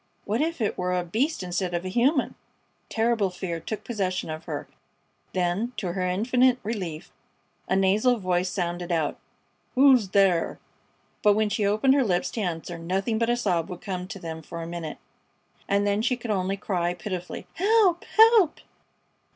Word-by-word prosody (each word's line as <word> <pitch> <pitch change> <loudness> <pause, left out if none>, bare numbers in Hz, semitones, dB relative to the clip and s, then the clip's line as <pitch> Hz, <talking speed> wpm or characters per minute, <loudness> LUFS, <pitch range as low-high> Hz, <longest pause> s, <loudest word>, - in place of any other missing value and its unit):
What 220 +6 0
if 325 -3 -1
it 210 - -1
were 180 0 0
a 180 - 0
beast 230 - -1
instead 180 0 -2
of 175 +2 -3
a - - -2
human! 255 - +2 0.6
Terrible 225 -3 +1
fear 180 -2 -4
took 215 +6 -5
possession 185 -7 -2
of 155 +1 -7
her; - - -5 0.7
then, 185 +7 0
to 180 -4 -2
her 185 +1 -3
infinite 245 +7 +3
relief, 185 -8 -5 0.6
a 190 - +2
nasal 205 +6 +3
voice 185 -2 0
sounded 175 -1 -3
out: 160 -3 0 0.6
"Who's 260 -5 +6
thar?" 190 -3 +2 0.6
But 210 -1 +5
when 215 0 +1
she 205 -1 0
opened 215 +6 +3
her 275 -1 +3
lips 180 -6 0
to 225 - -3
answer, 170 -2 -4
nothing 195 +6 -1
but 230 0 +1
a 240 - +2
sob 180 -8 0
would 180 -1 -7
come 185 -2 -4
to 200 +1 -7
them 160 -3 -6
for 165 +1 -7
a - - -6
minute, 170 -2 -5 0.7
and 200 +1 +2
then 205 +1 +1
she 250 +2 +1
could 240 -2 -4
only 195 0 0
cry, 175 -3 -1
pitifully: 180 0 -5
"Help! 390 -3 +3
Help!" 445 -7 +5
195 Hz, 175 wpm, -26 LUFS, 175-235 Hz, 0.7 s, Who's